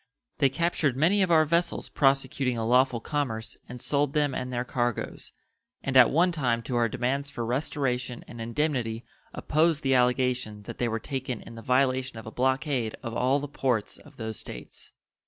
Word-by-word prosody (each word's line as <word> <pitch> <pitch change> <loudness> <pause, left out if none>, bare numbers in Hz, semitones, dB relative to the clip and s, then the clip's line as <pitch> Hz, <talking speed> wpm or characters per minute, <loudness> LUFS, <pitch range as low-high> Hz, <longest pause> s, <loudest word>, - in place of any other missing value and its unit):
They 140 -2 +5
captured 150 -2 0
many 180 +8 +3
of 185 - +2
our 160 -2 +5
vessels 170 +2 0
prosecuting 135 -2 +1
a 115 - -1
lawful 125 +1 +3
commerce 115 -5 -3
and 125 0 -7
sold 145 +2 +1
them 145 -2 +1
and 125 0 -3
their 120 0 -2
cargoes, 120 -2 -2 0.5
and 135 - -2
at 130 -3 +8
one 175 +5 +3
time 125 -8 0
to 120 - -3
our 120 -1 +2
demands 135 +5 -1
for 120 -4 -4
restoration 125 -1 -1
and 120 - -9
indemnity 120 -2 -1 0.3
opposed 155 0 +1
the 135 -1 +2
allegation 125 -4 +1
that - - -8
they 120 - +1
were 115 0 -1
taken 130 -1 -4
in - - -11
the 115 - -9
violation 130 0 +1
of 110 - -8
a 110 - -7
blockade 130 -2 0
of 115 -1 -5
all 130 +3 +2
the 145 - -5
ports 125 -6 -1
of - - -17
those 110 -2 -5
States. - - -8
130 Hz, 185 wpm, -27 LUFS, 120-145 Hz, 0.5 s, at